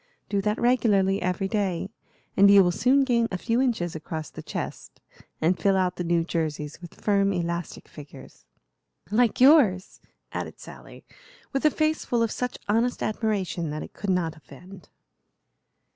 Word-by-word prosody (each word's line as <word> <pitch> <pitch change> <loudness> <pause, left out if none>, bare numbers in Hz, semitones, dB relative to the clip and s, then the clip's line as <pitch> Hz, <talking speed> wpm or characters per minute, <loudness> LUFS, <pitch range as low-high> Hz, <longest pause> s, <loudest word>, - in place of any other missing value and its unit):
"Do 200 -1 0
that 210 +2 -1
regularly 205 -6 +2
every 185 +2 -1
day, 195 -2 -2 0.4
and 200 +1 +6
you 200 -1 +8
will 175 - +2
soon 260 +9 +3
gain 235 -3 +2
a 185 - -3
few 230 +6 0
inches 215 -11 -1
across 155 0 -6
the - - -9
chest - - -7 0.4
and 170 +2 +1
fill 195 +3 +2
out 185 -1 0
the 180 - -2
new 170 -1 +1
jerseys 155 -2 -4
with 175 - -12
firm, 200 -1 +2
elastic 170 -2 -4
figures." 140 - -13 0.6
"Like 235 +2 +2
yours," 250 - +4 0.3
added - - -6
Sally, - - -13 0.5
with 270 +2 -1
a - - +7
face 310 +1 0
full 235 -1 0
of 225 - -1
such 250 0 -3
honest 230 +4 0
admiration 200 -6 -2
that 150 +1 -4
it - - -11
could 205 - -5
not 175 -4 0
offend. 175 +4 -14
195 Hz, 160 wpm, -25 LUFS, 170-230 Hz, 0.6 s, you